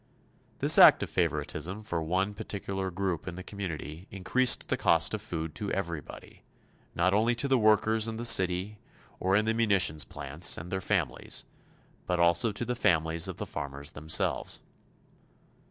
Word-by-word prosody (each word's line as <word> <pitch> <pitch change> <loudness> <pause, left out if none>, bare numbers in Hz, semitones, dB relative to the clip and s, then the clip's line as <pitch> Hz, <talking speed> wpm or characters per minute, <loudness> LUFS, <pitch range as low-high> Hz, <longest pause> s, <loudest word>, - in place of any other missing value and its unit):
This - - +5
act - - +8
of - - -6
favoritism 95 +5 -2
for 85 -6 -3
one 95 +5 -1
particular 95 -1 -4
group 95 -2 -3
in 90 - -5
the 95 - -8
community 90 -3 -7
increased 120 +6 +2
the - - 0
cost - - +2
of - - -3
food 80 -2 -5
to 100 +4 -5
everybody 85 -7 -6 0.5
not 95 +3 +2
only 115 +4 +2
to 140 - -1
the 135 -2 +2
workers 110 +1 +3
in 110 0 -5
the 120 - -4
city 95 -1 +2 0.4
or 95 +1 +1
in 105 +1 +2
the 110 - +1
munitions 100 -9 +2
plants, 75 +5 -1
and 85 +3 -8
their 95 0 -2
families, - - -2 0.6
but 90 -1 0
also 85 +5 +3
to 105 +4 -5
the 125 - -2
families 85 -8 +1
of - - -6
the - - -4
farmers 70 +1 -6
themselves. 80 +2 0
95 Hz, 165 wpm, -29 LUFS, 85-105 Hz, 0.6 s, act